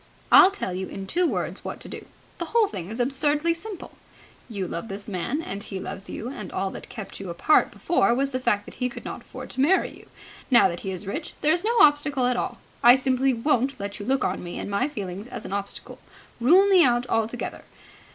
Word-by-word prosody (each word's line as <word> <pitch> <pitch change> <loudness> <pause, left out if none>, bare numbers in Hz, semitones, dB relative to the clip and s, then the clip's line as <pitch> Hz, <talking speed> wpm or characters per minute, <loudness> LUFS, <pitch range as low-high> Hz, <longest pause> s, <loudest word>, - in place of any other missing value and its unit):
"I'll 370 - +9
tell 390 - -4
you 185 +1 -3
in 195 - -7
two 350 - +1
words - - -3
what - - -6
to - - -8
do. - - -9 0.3
The 340 - -2
whole 440 +5 +3
thing 185 - -6
is 225 +3 -6
absurdly 290 +6 +1
simple. 390 +3 -8 0.6
You 200 -5 -3
love 170 +6 -5
this 200 0 -7
man 220 - -2
and 200 -7 -5
he 195 -2 -5
loves 195 +1 -6
you, 230 - -5
and 210 -8 -7
all 195 0 -2
that - - -9
kept 215 -4 -8
you 195 -2 -6
apart 170 - +3
before 345 - +1
was 275 +2 0
the 255 - -2
fact 210 -5 +1
that - - -11
he 250 - +1
could - - -10
not - - -6
afford - - -10
to 260 - -2
marry 355 +8 +2
you. - - -16 0.4
Now 240 -6 +6
that 170 0 -5
he 195 - -5
is 185 +1 -5
rich, 295 - -5
there 305 +1 +4
is 350 +2 0
no 465 +2 +1
obstacle 290 -5 +4
at 250 0 +2
all. - - -3 0.2
I 240 +1 +9
simply 265 0 +1
won't 260 +1 0
let 200 +1 -5
you 205 - -6
look 270 0 +1
on 185 - -1
me 175 0 -6
and - - -5
my 245 +8 +1
feelings 200 -5 -6
as 240 -2 -8
an - - -5
obstacle. 200 0 -5 0.4
Rule 345 +12 +6
me 375 -3 +6
out 245 -2 +3
altogether. 225 0 -2
245 Hz, 230 wpm, -25 LUFS, 200-295 Hz, 0.6 s, I'll